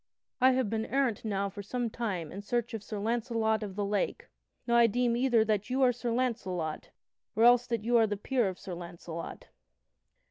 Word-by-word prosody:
I 260 +1 +6
have 255 -3 +1
been 220 +1 -2
errant 265 -5 0
now 200 -2 -1
for 200 +1 -7
some 240 +4 -2
time 190 -10 -3
in 195 - -6
search 235 +3 -2
of 225 - -4
Sir 210 +1 -6
Launcelot 225 0 0
of 200 -3 -5
the 205 0 -1
Lake. 205 0 -2 0.4
Now, 235 - +1
I 235 -1 +7
deem 240 +2 +1
either 240 -3 +3
that 210 0 0
you 260 +1 +2
are 250 - +6
Sir 240 0 -4
Launcelot, 190 -10 -2 0.5
or 225 - +3
else 245 +1 +6
that 230 -3 -2
you 240 +1 +3
are 225 -1 +5
the 205 -1 -2
peer 245 +1 0
of 185 - -7
Sir 195 -3 -7
Launcelot." 170 -1 -8
225 Hz, 205 wpm, -30 LUFS, 200-240 Hz, 0.5 s, I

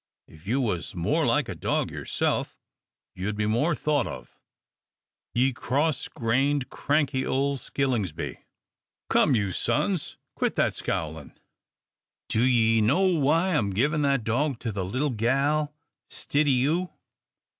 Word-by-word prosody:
If 80 +3 -17
you 125 +6 +1
was 90 -10 -2
more 85 -1 +1
like - - +2
a - - -4
dog - - -1
yerself, - - -2 0.6
ye'd 95 +3 -3
be 105 0 -1
more 120 +10 +1
thought 150 -4 0
of, - - -9 1.0
ye 130 +2 +3
cross 140 +4 -1
grained, 135 +4 0
cranky 140 -3 0
ole 140 +1 0
skillingsby' 110 - -2 0.7
come 140 - +4
you, 100 -4 0
sons, 145 - -1 0.2
quit - - -1
that - - +2
scowlin'. 80 -2 -4 0.9
Do 110 - +2
ye 115 -3 +4
know 140 - +3
why 160 +4 +2
I'm 110 -10 +1
givin' 140 +10 +1
that 140 -4 +2
dog 130 +5 0
to 115 - -2
the 100 -2 -3
little 130 +10 -1
gal 135 +6 +1 0.4
stid 145 +1 0
o' - - +4
you?" 150 +8 +2
130 Hz, 135 wpm, -26 LUFS, 110-145 Hz, 1.0 s, come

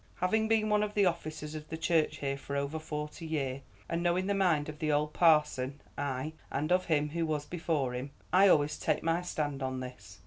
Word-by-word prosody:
Having 220 +5 +1
been 220 -1 +3
one 210 -1 +3
of 210 0 -2
the 205 -1 +4
officers 155 -3 -2
of 155 0 -7
the 160 - -4
church 160 -1 +1
here 140 -1 -2
for 140 0 -6
over 140 +3 -1
forty 150 +1 -5
year, 140 -4 -2 0.3
and 165 +1 -1
knowing 175 +2 +1
the 200 - +1
mind 175 -7 +2
of 150 -1 -7
the 155 -1 0
old 150 +1 +1
parson, 150 -5 +3 0.2
ay, 140 +2 -3 0.2
and 155 +4 -2
of 185 0 +3
him 150 -2 +1
who 165 +2 -1
was 155 -2 -1
before 160 -7 -1
him, 125 +3 -4 0.2
I 190 +2 +7
always 150 -4 +3
take - - 0
my 165 +1 +1
stand 150 -5 -3
on 130 -1 -2
this. 125 -6 -9
155 Hz, 215 wpm, -31 LUFS, 145-175 Hz, 0.3 s, I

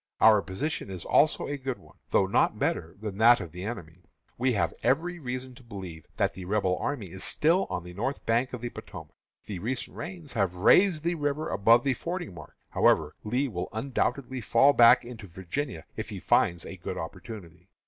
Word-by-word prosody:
Our 110 -2 +7
position 100 +6 -4
is 95 -3 -6
also 155 - +3
a 145 - -3
good 130 -1 -3
one, - - -20
though 95 - +3
not 95 - +2
better 80 +1 -1
than 105 -2 -6
that 120 +2 +7
of 85 - -7
the 90 +1 -7
enemy. 90 -6 -7 0.3
We 125 +1 +1
have 85 -6 0
every 170 +6 +1
reason 130 -2 -5
to 125 - -16
believe 95 -8 -9
that - - +1
the 95 0 -8
Rebel 95 -1 +1
army 115 -11 -3
is 95 +1 -7
still 170 +5 +2
on 90 - -3
the 90 0 -10
north 120 +9 -3
bank 120 +3 +1
of 125 - -6
the 120 -1 -4
Potomac. - - -10 0.3
The 100 -4 -5
recent 125 +6 -4
rains 170 -3 -7
have 95 -4 0
raised 160 - +4
the 170 +1 +1
river 145 -1 -2
above 115 +4 +4
the 135 - +2
fording 170 - -5
mark. 80 -4 -12 0.2
However, 75 -1 +3
Lee 125 +6 0
will 90 -8 -4
undoubtedly 130 +2 -2
fall 115 +7 +5
back 115 -2 +7
into 120 -4 -9
Virginia 95 - -5
if - - -5
he - - -6
finds 85 -1 +2
a 95 - -8
good 85 - -5
opportunity. 90 0 -9
115 Hz, 200 wpm, -28 LUFS, 90-135 Hz, 0.3 s, Our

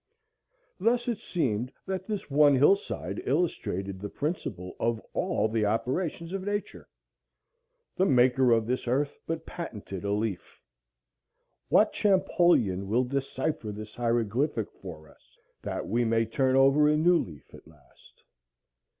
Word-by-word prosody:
Thus 240 +1 +1
it 235 -4 -1
seemed 125 - -2
that 190 -1 -4
this 210 -3 -4
one 145 0 +5
hillside 125 - +1
illustrated 100 - -1
the 105 - -5
principle 140 - -4
of 115 -1 0
all 105 - 0
the 110 0 0
operations 160 - -2
of 195 - -2
Nature. 205 +1 -4 1.1
The 190 - +3
Maker 125 0 +4
of 115 -1 +3
this 125 +2 -2
earth 140 +4 0
but 165 0 -3
patented 105 - -7
a 100 - -1
leaf. 105 -4 -3 1.1
What - - +4
Champollion 175 - +2
will 120 +5 +2
decipher 135 -1 -3
this 105 +1 -8
hieroglyphic 120 +1 0
for 80 -5 -11
us, - - -24 0.2
that - - -4
we 120 +4 +1
may 115 0 +2
turn 130 +3 +1
over 135 +3 +5
a 150 - +3
new 175 +3 +4
leaf 75 -6 -8
at - - -14
last? 75 -4 -22
125 Hz, 135 wpm, -28 LUFS, 105-160 Hz, 1.1 s, one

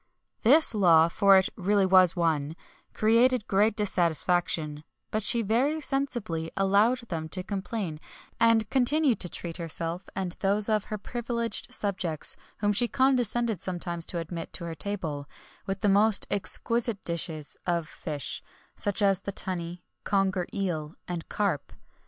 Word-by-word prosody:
This 285 +4 +5
law, 170 -6 +5
for 195 +2 +5
it 190 +1 +3
really 200 0 +2
was 185 -1 +5
one, 160 -3 0 0.4
created 230 +1 +3
great 205 +3 +2
dissatisfaction; 175 -5 +2 0.3
but 215 - -1
she 230 +3 +2
very 255 +9 +1
sensibly 240 - -2
allowed 205 +6 +3
them 160 -2 -4
to 185 +2 -3
complain, 195 -4 -4 0.4
and 230 -2 +4
continued 270 0 +2
to 175 - -2
treat 170 0 -6
herself 170 +1 -3
and 185 -2 -3
those 205 +2 +1
of 215 -1 +1
her 215 - -5
privileged 235 +1 -4
subjects 180 -6 -1 0.3
whom 205 0 +2
she 240 +4 +3
condescended 240 - +1
sometimes 175 -3 -3
to 175 - -3
admit 165 0 -5
to 170 - -2
her 165 - -5
table, 160 -7 -4 0.4
with 195 +2 -3
the 210 - +2
most 205 +1 +5
exquisite 220 +3 0
dishes 160 -3 -1
of 170 -2 0
fish, 150 -6 -5 0.3
such 205 +1 0
as 195 -1 +3
the 200 - -4
tunny, 180 -2 -4 0.2
conger 195 -3 0
eel, 165 -6 -3
and 175 -2 -5
carp. 200 -9 -2
195 Hz, 145 wpm, -27 LUFS, 170-220 Hz, 0.4 s, This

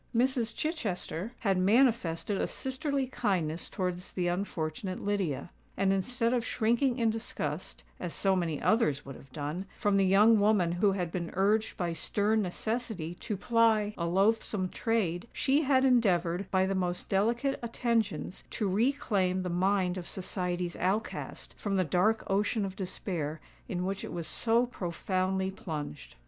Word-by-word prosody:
Mrs. 245 -1 +1
Chichester 225 - -3
had 195 -4 +2
manifested 205 -3 +2
a - - +1
sisterly 270 +1 -2
kindness 190 -11 -1
towards 180 -1 -3
the 180 -2 0
unfortunate 180 0 -3
Lydia; 190 -7 -2 0.3
and, 195 0 +3
instead 230 +4 0
of 245 -2 +1
shrinking 240 +3 +1
in 230 -3 +2
disgust, 180 -8 -4 0.2
as 175 - -4
so 195 +2 +2
many 165 -5 -1
others 150 - +2
would 135 - -7
have 135 - -15
done, 155 +7 -4
from 205 -1 +2
the 195 - +4
young 210 +4 +6
woman 205 -5 +3
who 195 +3 +2
had 180 -4 -2
been 170 -2 -3
urged 210 +4 +2
by 175 -2 -1
stern 210 +5 +1
necessity 210 -2 -3
to 210 - -3
ply 220 -1 +3
a 170 - -2
loathsome 195 +1 +1
trade, 215 -4 -1
she 280 +3 +2
had 265 -2 +3
endeavoured, 190 -7 +2
by 190 0 +3
the 195 - 0
most 180 -2 -1
delicate 235 +7 +1
attentions, 230 -5 -1
to 210 - -1
reclaim 195 -4 +1
the 180 - -2
mind 185 +1 +1
of 175 - -8
society's 180 -2 -3
outcast 195 +5 -2
from 200 -2 -1
the 185 - +3
dark 185 +7 +2
ocean 205 +2 +1
of 190 -1 -5
despair 170 -5 -3 0.3
in 180 -3 -2
which 195 +1 -3
it - - -6
was 170 -2 -4
so 230 +6 +2
profoundly 190 -2 -1
plunged. 150 - -6
195 Hz, 155 wpm, -30 LUFS, 180-225 Hz, 0.3 s, young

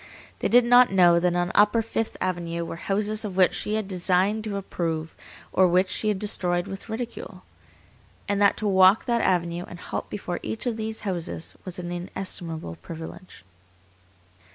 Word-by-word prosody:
They - - 0
did 245 0 +5
not 245 -1 +6
know 175 -3 +5
that 175 0 +1
on 175 0 0
upper 210 +2 +4
Fifth 225 0 -3
Avenue 170 -2 -2
were 165 - -6
houses 210 +4 -1
of 195 -3 -5
which 185 -1 +5
she 210 - -1
had 215 -2 -2
deigned 190 +3 +1
to 210 -2 -3
approve, 165 -4 -3 0.4
or 185 - +5
which 185 +2 +2
she 215 - 0
had 210 -2 +1
destroyed 180 -3 0
with 195 +2 -7
ridicule, 230 +1 -6 0.8
and 205 0 0
that 200 - +4
to 215 - -2
walk 190 +1 +5
that 235 -1 +1
avenue 175 -1 0
and 175 - -10
halt - - -5
before 180 -3 -4
each 220 - -4
of 240 -2 0
these 220 0 -4
houses 175 -4 -4
was 185 -2 -6
an 175 -1 -5
inestimable 175 - -5
privilege. 165 - -10
190 Hz, 175 wpm, -25 LUFS, 175-215 Hz, 0.8 s, not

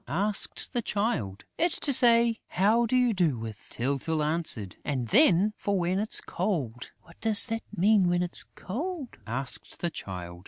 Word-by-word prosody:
asked 195 - -2
the 240 - 0
Child. 200 - -2
"It's 340 0 +3
to 280 - +2
say 235 -2 +5
How 220 +5 +2
do 255 - 0
you 250 -2 +3
do 170 - +1
with," 110 -2 -8
Tyltyl 140 +5 -1
answered. 150 - -2
"And 130 -5 -3
then 210 - +4
for 200 -1 -1
when 180 +2 0
it's 215 +1 0
cold...." 145 - -3
"What 170 -1 -20
does 220 -1 +6
that 225 -1 -3 0.2
mean, 195 0 +4
when 175 0 +1
it's 175 - -1
cold?" 290 - -5
asked 130 +4 -4
the 175 - -2
Child. 90 - -7
180 Hz, 165 wpm, -27 LUFS, 135-225 Hz, 0.2 s, does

